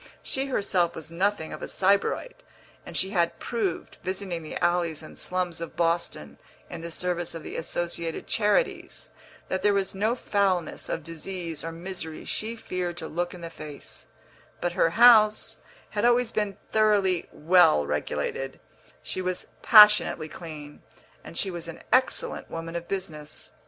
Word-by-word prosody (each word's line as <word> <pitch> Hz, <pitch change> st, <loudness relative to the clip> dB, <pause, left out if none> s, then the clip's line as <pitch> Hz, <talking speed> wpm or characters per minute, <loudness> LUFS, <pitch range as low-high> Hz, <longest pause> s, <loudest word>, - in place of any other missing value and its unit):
She 270 Hz, +1 st, -1 dB
herself 190 Hz, -8 st, +1 dB
was 160 Hz, 0 st, -7 dB
nothing 185 Hz, -1 st, 0 dB
of -, -, -8 dB
a -, -, -4 dB
sybarite, 200 Hz, -, +1 dB, 0.5 s
and -, -, -4 dB
she 190 Hz, -, 0 dB
had 170 Hz, -4 st, +1 dB
proved, 215 Hz, -7 st, -3 dB
visiting 185 Hz, -2 st, -3 dB
the 155 Hz, -, -6 dB
alleys 175 Hz, -3 st, 0 dB
and -, -, -11 dB
slums 180 Hz, -2 st, -2 dB
of 170 Hz, -, -6 dB
Boston 170 Hz, -, -1 dB, 0.3 s
in 170 Hz, -, -6 dB
the 170 Hz, -, -6 dB
service 175 Hz, 0 st, -2 dB
of 165 Hz, -, -7 dB
the -, -, -7 dB
Associated 170 Hz, 0 st, -3 dB
Charities, 360 Hz, -, 0 dB, 0.4 s
that 190 Hz, -, -2 dB
there 205 Hz, -1 st, +3 dB
was 195 Hz, -1 st, +1 dB
no 215 Hz, +5 st, +1 dB
foulness 195 Hz, -7 st, 0 dB
of 165 Hz, -, -2 dB
disease 165 Hz, 0 st, -6 dB
or 165 Hz, -, -4 dB
misery 165 Hz, -2 st, -6 dB
she 225 Hz, +2 st, -3 dB
feared 180 Hz, -5 st, -4 dB
to 160 Hz, -, -5 dB
look 175 Hz, +3 st, -3 dB
in 175 Hz, -, -11 dB
the 165 Hz, 0 st, -7 dB
face; 150 Hz, -3 st, -10 dB, 0.5 s
but 175 Hz, -, -1 dB
her 165 Hz, -, +3 dB
house 215 Hz, +2 st, +6 dB, 0.3 s
had 205 Hz, -, -1 dB
always 240 Hz, -1 st, +3 dB
been 205 Hz, -2 st, -1 dB
thoroughly 205 Hz, -5 st, +3 dB
well 155 Hz, -, +5 dB
regulated, 135 Hz, -, -3 dB, 0.4 s
she 185 Hz, -, -3 dB
was 185 Hz, -1 st, -2 dB, 0.2 s
passionately 210 Hz, -7 st, +7 dB
clean, 155 Hz, -2 st, -9 dB, 0.4 s
and 170 Hz, -, -9 dB
she 195 Hz, -, 0 dB
was 170 Hz, -1 st, -6 dB
an 165 Hz, -, -9 dB
excellent 255 Hz, +1 st, +1 dB
woman 165 Hz, +1 st, -6 dB
of 170 Hz, 0 st, -4 dB
business. 160 Hz, -6 st, -4 dB
180 Hz, 155 wpm, -27 LUFS, 165-205 Hz, 0.5 s, passionately